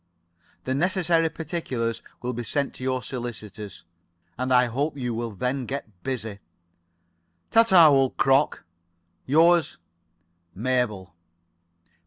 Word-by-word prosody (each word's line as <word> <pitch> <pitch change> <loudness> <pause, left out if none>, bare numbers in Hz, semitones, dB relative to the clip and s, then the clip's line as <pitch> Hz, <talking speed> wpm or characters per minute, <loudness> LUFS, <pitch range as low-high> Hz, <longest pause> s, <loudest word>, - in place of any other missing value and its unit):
"The 130 - -2
necessary 170 +1 +2
particulars 135 -9 -3 0.2
will 125 +1 -2
be 120 +1 -4
sent 140 +3 -2
to - - -10
your 130 -1 -1
solicitors, 110 -6 -7 0.5
and 130 +1 -3
I 125 0 +5
hope 140 +5 -2
you 125 -3 -2
will 115 +1 -3
then 125 +5 -3
get 110 -9 -6
busy. 110 -5 -4 1.1
"Ta 225 - +7
ta, 185 -8 +7
old 135 -3 +3
crock. 135 +2 +2 0.6
Yours, 165 +4 +4 0.8
Mabel. 110 -4 -1
130 Hz, 115 wpm, -25 LUFS, 115-150 Hz, 1.1 s, Ta